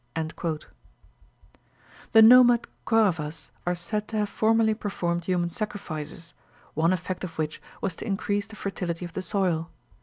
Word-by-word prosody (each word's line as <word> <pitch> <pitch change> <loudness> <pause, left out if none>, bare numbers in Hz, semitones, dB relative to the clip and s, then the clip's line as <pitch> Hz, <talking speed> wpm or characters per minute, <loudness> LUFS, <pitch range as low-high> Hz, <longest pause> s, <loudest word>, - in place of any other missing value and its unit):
The 225 -1 +9
nomad 245 0 +8 0.2
Koravas 165 -9 +1 0.2
are 175 - +2
said 210 +5 -3
to 220 - -3
have 210 -1 0
formerly 220 +1 +3
performed 175 -5 -2
human 175 -2 0
sacrifices, 165 -6 -5 0.4
one 165 +3 +2
effect 185 0 -2
of 165 -3 -6
which 155 -1 -3 0.2
was 190 -4 -2
to - - -6
increase 205 0 -1
the 220 - -11
fertility 180 -4 -3
of 175 - -9
the - - -3
soil. 180 -3 0
185 Hz, 140 wpm, -26 LUFS, 170-215 Hz, 0.4 s, The